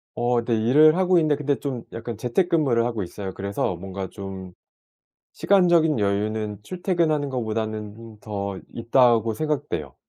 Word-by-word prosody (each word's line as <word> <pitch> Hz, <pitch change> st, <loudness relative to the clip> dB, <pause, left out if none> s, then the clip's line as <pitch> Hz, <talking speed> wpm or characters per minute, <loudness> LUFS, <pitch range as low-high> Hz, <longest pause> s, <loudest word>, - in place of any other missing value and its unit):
어 120 Hz, 0 st, +1 dB
네. 115 Hz, -1 st, 0 dB
일을 150 Hz, +9 st, +5 dB
하고 185 Hz, -1 st, +4 dB
있는데 155 Hz, -3 st, +2 dB
근데 145 Hz, -1 st, 0 dB
좀 130 Hz, -5 st, -4 dB
약간 115 Hz, -1 st, -6 dB
재택근무를 140 Hz, -2 st, +1 dB
하고 115 Hz, -3 st, -2 dB
있어요. 95 Hz, +1 st, -6 dB
그래서 100 Hz, -2 st, -2 dB
뭔가 95 Hz, +1 st, -6 dB
좀 95 Hz, -2 st, -8 dB, 0.8 s
시간적인 170 Hz, -, +3 dB
여유는 105 Hz, +1 st, -1 dB
출퇴근하는 170 Hz, -, 0 dB
것보다는 110 Hz, -3 st, -2 dB, 0.4 s
음 -, -, -26 dB
더 100 Hz, -2 st, -4 dB, 0.2 s
있다고 115 Hz, -1 st, +3 dB
생각돼요. 145 Hz, -, -3 dB
115 Hz, 325 characters per minute, -24 LUFS, 100-150 Hz, 0.8 s, 일을